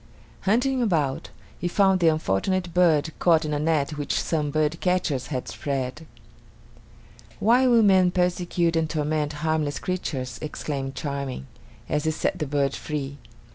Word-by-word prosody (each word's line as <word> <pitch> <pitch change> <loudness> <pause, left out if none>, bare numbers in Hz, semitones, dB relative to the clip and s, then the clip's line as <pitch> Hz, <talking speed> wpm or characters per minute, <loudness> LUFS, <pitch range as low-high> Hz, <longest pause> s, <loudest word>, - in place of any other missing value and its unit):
Hunting 255 +4 +2
about, 155 - 0 0.3
he 175 - -1
found 190 +1 +3
the 170 - +3
unfortunate 165 - 0
bird 160 -3 +3
caught 165 -2 +4
in 150 - -2
a 145 - 0
net 150 -1 0
which 145 - -1
some 150 -3 -1
birdcatchers 155 -1 0
had 130 -4 -4
spread. 140 +2 -4 1.3
"Why 245 +4 +4
will 235 -2 +5
men 190 -3 +5
persecute 175 -1 0
and 160 -1 +1
torment 150 -1 -1
harmless 155 -2 0
creatures!" 140 -8 -4
exclaimed 140 -3 -4
Charming, 140 - -4 0.4
as 150 +1 -1
he - - +2
set 160 +3 -1
the 155 - -2
bird 140 -1 0
free. 145 -2 -5
155 Hz, 140 wpm, -25 LUFS, 145-180 Hz, 1.3 s, will